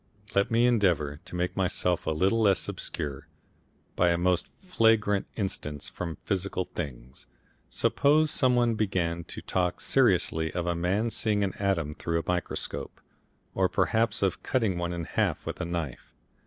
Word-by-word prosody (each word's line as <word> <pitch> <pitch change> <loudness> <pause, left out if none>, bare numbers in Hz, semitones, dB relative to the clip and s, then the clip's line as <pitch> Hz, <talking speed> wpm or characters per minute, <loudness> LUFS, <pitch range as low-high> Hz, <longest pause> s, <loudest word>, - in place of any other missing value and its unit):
Let 100 0 +2
me 115 +1 +3
endeavour 90 -12 +2
to - - -8
make 90 0 -1
myself 90 -2 0
a - - +3
little 95 +8 +2
less 100 -3 +3
obscure 70 -3 -4 0.7
by 90 - +3
a 85 - +2
most 90 0 +1
flagrant 110 - +2
instance 75 -8 -3
from 85 -2 -5
physical 95 -2 -1
things. 70 -8 -7 0.4
Suppose 150 +2 +3
some 130 -2 +3
one 120 -1 +3
began 90 -6 -1
to - - -8
talk 90 -1 0
seriously 90 -10 +2
of 85 -1 -2
a 85 - +1
man 95 +7 0
seeing 105 -2 +1
an 95 -2 -1
atom 90 -7 0
through 85 +2 -1
a - - -4
microscope, 90 -1 -3 0.5
or 95 -1 +2
better - - -22
perhaps 115 -2 +2
of 95 - 0
cutting 110 -8 0
one 85 0 -2
in 85 -1 -3
half - - -1
with - - -4
a - - -1
knife. 85 -6 -5
90 Hz, 165 wpm, -28 LUFS, 85-110 Hz, 0.7 s, me